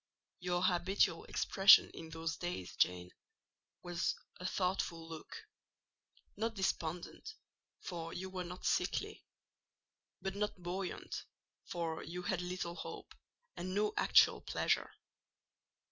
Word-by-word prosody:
Your 180 Hz, 0 st, 0 dB
habitual 180 Hz, -1 st, +2 dB
expression 195 Hz, 0 st, +7 dB
in 160 Hz, -, -9 dB
those 165 Hz, 0 st, -3 dB
days, 175 Hz, -, -4 dB
Jane, 90 Hz, 0 st, +1 dB, 0.7 s
was 175 Hz, 0 st, 0 dB, 0.2 s
a 180 Hz, -, -2 dB
thoughtful 180 Hz, -3 st, -1 dB
look; 165 Hz, -, -8 dB, 0.9 s
not 225 Hz, +2 st, -1 dB
despondent, 180 Hz, -, -2 dB, 0.5 s
for 165 Hz, -2 st, -5 dB
you 190 Hz, +2 st, -4 dB
were 185 Hz, -1 st, -3 dB
not 180 Hz, +1 st, -8 dB
sickly; -, -, 0 dB, 1.0 s
but 195 Hz, -, -3 dB
not 210 Hz, 0 st, -1 dB
buoyant, 180 Hz, +1 st, -4 dB, 0.4 s
for 165 Hz, -2 st, -3 dB
you 180 Hz, +2 st, -6 dB
had 180 Hz, -1 st, 0 dB
little 180 Hz, -1 st, -3 dB
hope, -, -, -7 dB, 0.4 s
and 185 Hz, +2 st, -4 dB
no 210 Hz, +1 st, +2 dB
actual -, -, +6 dB
pleasure. -, -, +1 dB
180 Hz, 115 wpm, -36 LUFS, 165-190 Hz, 1.0 s, expression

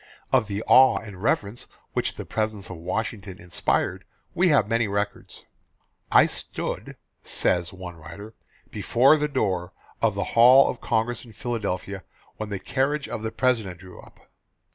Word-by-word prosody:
Of 125 Hz, -5 st, +4 dB
the 105 Hz, +1 st, -3 dB
awe 130 Hz, 0 st, +6 dB
and 100 Hz, -4 st, -9 dB
reverence 105 Hz, +1 st, -1 dB, 0.3 s
which -, -, -1 dB
the -, -, -7 dB
presence 110 Hz, -3 st, -3 dB
of 90 Hz, -, -7 dB
Washington 95 Hz, +2 st, -4 dB
inspired 85 Hz, 0 st, -1 dB, 0.3 s
we 180 Hz, +1 st, +3 dB
have 135 Hz, -9 st, +4 dB
many 115 Hz, 0 st, +1 dB
records. 100 Hz, 0 st, -4 dB, 0.7 s
"I -, -, +7 dB
stood," -, -, -5 dB, 0.3 s
says 90 Hz, -1 st, 0 dB
one 90 Hz, -2 st, -9 dB
writer, 85 Hz, +8 st, -10 dB, 0.4 s
"before 135 Hz, +6 st, +4 dB
the 150 Hz, 0 st, 0 dB
door 95 Hz, -10 st, -1 dB, 0.3 s
of -, -, +2 dB
the -, -, -1 dB
Hall 125 Hz, +4 st, +8 dB
of -, -, -11 dB
Congress 115 Hz, +1 st, -1 dB
in 115 Hz, -3 st, -14 dB
Philadelphia 100 Hz, -4 st, -4 dB, 0.3 s
when 110 Hz, -1 st, -5 dB
the 100 Hz, -, -3 dB
carriage 140 Hz, +8 st, -1 dB
of -, -, -5 dB
the 110 Hz, 0 st, -3 dB
President 115 Hz, -10 st, 0 dB
drew 90 Hz, 0 st, -12 dB
up. -, -, -19 dB
110 Hz, 155 wpm, -25 LUFS, 95-120 Hz, 0.7 s, Hall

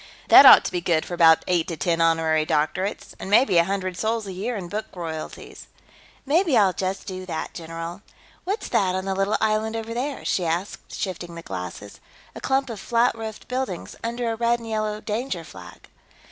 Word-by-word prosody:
That 275 Hz, -, +10 dB
ought -, -, +9 dB
to -, -, -2 dB
be 180 Hz, -1 st, -2 dB
good 165 Hz, -2 st, +1 dB
for -, -, -7 dB
about 165 Hz, -2 st, +5 dB
eight 175 Hz, -3 st, +1 dB
to 165 Hz, -, -5 dB
ten 165 Hz, +3 st, 0 dB
honorary 165 Hz, -1 st, +2 dB
doctorates. 155 Hz, +6 st, -1 dB
And -, -, -6 dB
maybe 205 Hz, -4 st, +5 dB
a -, -, +5 dB
hundred 190 Hz, -1 st, -2 dB
sols 220 Hz, +1 st, -1 dB
a 195 Hz, -, -6 dB
year 210 Hz, +7 st, -3 dB
in 190 Hz, -4 st, -5 dB
book 210 Hz, +4 st, -4 dB
royalties." 160 Hz, -3 st, -7 dB, 0.6 s
"Maybe 310 Hz, -1 st, +3 dB
I'll 195 Hz, -4 st, +4 dB
just 190 Hz, +1 st, -3 dB
do 185 Hz, -1 st, -6 dB
that, 160 Hz, -3 st, -4 dB
general.... 165 Hz, +2 st, -7 dB, 0.4 s
What's 400 Hz, +5 st, -3 dB
that, 185 Hz, -2 st, +1 dB
on 190 Hz, 0 st, -3 dB
the 195 Hz, -, -1 dB
little 195 Hz, +2 st, +1 dB
island 220 Hz, +1 st, 0 dB
over 225 Hz, 0 st, -4 dB
there?" 265 Hz, +4 st, -4 dB
she 185 Hz, -, 0 dB
asked, 170 Hz, +4 st, -3 dB
shifting 175 Hz, -3 st, -5 dB
the 170 Hz, -, -8 dB
glasses. 95 Hz, -, -7 dB, 0.3 s
"A -, -, -9 dB
clump 270 Hz, -1 st, 0 dB
of 220 Hz, -, -7 dB
flat 235 Hz, +4 st, +2 dB
roofed 220 Hz, -1 st, -8 dB
buildings. 250 Hz, -8 st, -4 dB
Under 235 Hz, 0 st, -2 dB
a -, -, -2 dB
red 235 Hz, +1 st, +2 dB
and 230 Hz, -, -10 dB
yellow 215 Hz, -1 st, -2 dB
danger 215 Hz, -5 st, -3 dB
flag." 90 Hz, -, -13 dB
190 Hz, 200 wpm, -24 LUFS, 170-225 Hz, 0.6 s, That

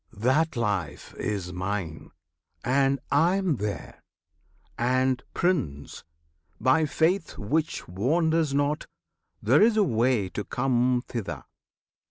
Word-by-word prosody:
That 145 Hz, +8 st, +2 dB
Life 100 Hz, -10 st, -2 dB
Is 95 Hz, -4 st, -3 dB
Mine, 90 Hz, -3 st, -4 dB, 0.5 s
and 135 Hz, +1 st, +2 dB
I 165 Hz, +6 st, +4 dB
am 190 Hz, -8 st, 0 dB
there! 105 Hz, -1 st, -5 dB, 0.7 s
And, 130 Hz, +1 st, +1 dB
Prince! 130 Hz, -, -1 dB, 0.6 s
by 150 Hz, +4 st, +3 dB
faith 165 Hz, +4 st, 0 dB
Which 155 Hz, +10 st, -2 dB
wanders 160 Hz, -, +1 dB
not, 145 Hz, +2 st, 0 dB, 0.6 s
there 125 Hz, -, +4 dB
is 220 Hz, 0 st, +5 dB
a 210 Hz, -, +5 dB
way 120 Hz, -, +1 dB
to 105 Hz, -, -4 dB
come 125 Hz, 0 st, +1 dB
Thither. 85 Hz, -, -5 dB
130 Hz, 110 wpm, -26 LUFS, 105-155 Hz, 0.7 s, is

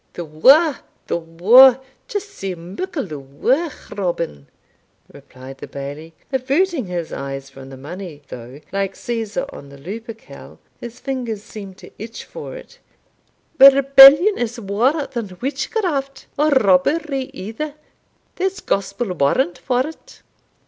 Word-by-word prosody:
"The 175 Hz, -, -6 dB
waur, 270 Hz, -, +4 dB, 0.3 s
the -, -, -2 dB
waur 220 Hz, +11 st, +6 dB, 0.3 s
just 410 Hz, 0 st, -5 dB
sae 195 Hz, -, -5 dB
muckle 195 Hz, -, -5 dB
the 155 Hz, -5 st, -7 dB
waur, 240 Hz, -, -1 dB, 0.2 s
Robin," 170 Hz, -, -3 dB, 0.7 s
replied 130 Hz, +1 st, -13 dB
the -, -, -8 dB
Bailie, 145 Hz, +4 st, -8 dB, 0.2 s
averting 275 Hz, -, 0 dB
his 175 Hz, -2 st, -4 dB
eyes 135 Hz, 0 st, -6 dB
from 135 Hz, -1 st, -12 dB
the 135 Hz, -, -10 dB
money, 155 Hz, +1 st, -9 dB
though, 125 Hz, +3 st, -10 dB
like 195 Hz, -1 st, -2 dB
Caesar 230 Hz, +2 st, -3 dB
on 140 Hz, -, -11 dB
the 140 Hz, -, -13 dB
Lupercal, 225 Hz, -, -10 dB, 0.2 s
his 240 Hz, +1 st, -9 dB
fingers 245 Hz, -6 st, -4 dB
seemed 195 Hz, -4 st, -10 dB
to -, -, -14 dB
itch 225 Hz, +2 st, -8 dB
for -, -, -9 dB
it -, -, -13 dB, 0.8 s
"Rebellion 275 Hz, +7 st, +8 dB
is 240 Hz, 0 st, -3 dB
waur 240 Hz, +9 st, 0 dB
than 210 Hz, -7 st, -6 dB
witchcraft, 275 Hz, -, -3 dB
or 300 Hz, +2 st, +2 dB
robbery 270 Hz, -, +2 dB
either; 225 Hz, +10 st, -6 dB, 0.6 s
there's 385 Hz, +1 st, -1 dB
gospel 200 Hz, +1 st, -2 dB
warrant 175 Hz, -, +1 dB
for't." 270 Hz, -, -4 dB
225 Hz, 130 wpm, -20 LUFS, 170-275 Hz, 0.8 s, Rebellion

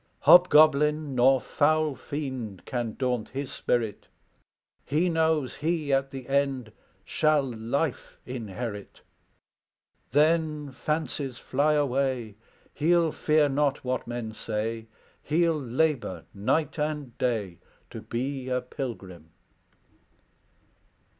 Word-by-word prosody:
"Hobgoblin 150 Hz, -3 st, +6 dB
nor 130 Hz, +1 st, +5 dB
foul 155 Hz, +2 st, +1 dB
fiend 130 Hz, -, -6 dB
Can 120 Hz, -3 st, -3 dB
daunt 125 Hz, -4 st, -1 dB
his 135 Hz, +1 st, -5 dB
spirit; 115 Hz, -4 st, -2 dB, 0.8 s
He 160 Hz, +6 st, +1 dB
knows 160 Hz, -4 st, +1 dB
he 155 Hz, -2 st, -1 dB
at 135 Hz, 0 st, +1 dB
the 135 Hz, -2 st, -8 dB
end 135 Hz, -4 st, 0 dB, 0.3 s
Shall 155 Hz, +3 st, +2 dB
life 125 Hz, +4 st, -3 dB
inherit. 115 Hz, -3 st, -6 dB, 1.1 s
Then, 150 Hz, 0 st, +2 dB
fancies 145 Hz, -2 st, -3 dB
fly 145 Hz, +5 st, +1 dB
away, 130 Hz, -5 st, 0 dB, 0.4 s
He'll 165 Hz, +1 st, +2 dB
fear 155 Hz, 0 st, +2 dB
not 145 Hz, 0 st, 0 dB
what 130 Hz, -1 st, -2 dB
men 120 Hz, -2 st, -5 dB
say; 110 Hz, +1 st, -4 dB, 0.3 s
He'll 165 Hz, 0 st, +1 dB
labor 125 Hz, -, -1 dB
night 150 Hz, +10 st, 0 dB
and 150 Hz, -5 st, -3 dB
day 105 Hz, -8 st, -1 dB, 0.3 s
To -, -, -7 dB
be 130 Hz, +2 st, -4 dB
a 125 Hz, 0 st, +1 dB
pilgrim." 100 Hz, -, -7 dB
135 Hz, 100 wpm, -27 LUFS, 120-150 Hz, 1.1 s, Hobgoblin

